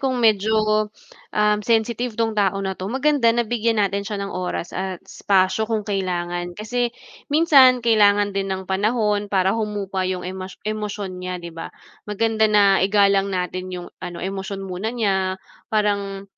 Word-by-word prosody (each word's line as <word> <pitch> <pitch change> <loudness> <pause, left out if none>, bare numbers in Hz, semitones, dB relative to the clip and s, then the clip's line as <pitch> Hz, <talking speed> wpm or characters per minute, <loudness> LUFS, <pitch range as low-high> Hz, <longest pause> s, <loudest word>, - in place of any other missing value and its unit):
kung 260 -2 0
medyo, 215 -1 +2 0.5
um, 210 0 +3
sensitive 230 +1 0
'tong 225 -1 +1
tao 200 -2 +1
na 190 - -1
'to, 185 +2 -6
maganda 270 -2 +2
nabigyan 230 -1 0
natin 200 0 +1
siya 210 - -3
ng 195 - -6
oras 180 -1 -4
at 190 -1 -3
espasyo 195 +2 +1
kung 220 -2 -1
kailangan, 175 -3 -3
kasi 240 +3 -1 0.4
minsan 275 -5 +5
kailangan 205 -3 +4
din 195 0 -1
ng 190 0 -3
panahon 205 +1 0
para 190 -1 +2
humupa 205 -3 -2
'yong 185 -1 -3
emas 185 0 -7
emosyon 210 -3 -4
niya 180 0 -4
'di 170 -1 -9
ba? 165 - -6 0.4
Maganda 220 +1 +1
na 200 -2 +4
igalang 200 0 +3
natin 185 0 -3
'yong 180 -1 -6 0.2
ano, 175 -2 -6
emosyon 195 0 -4
muna 185 +3 -4
niya, 190 -5 0 0.3
parang, 200 -2 0
205 Hz, 155 wpm, -22 LUFS, 190-220 Hz, 0.5 s, minsan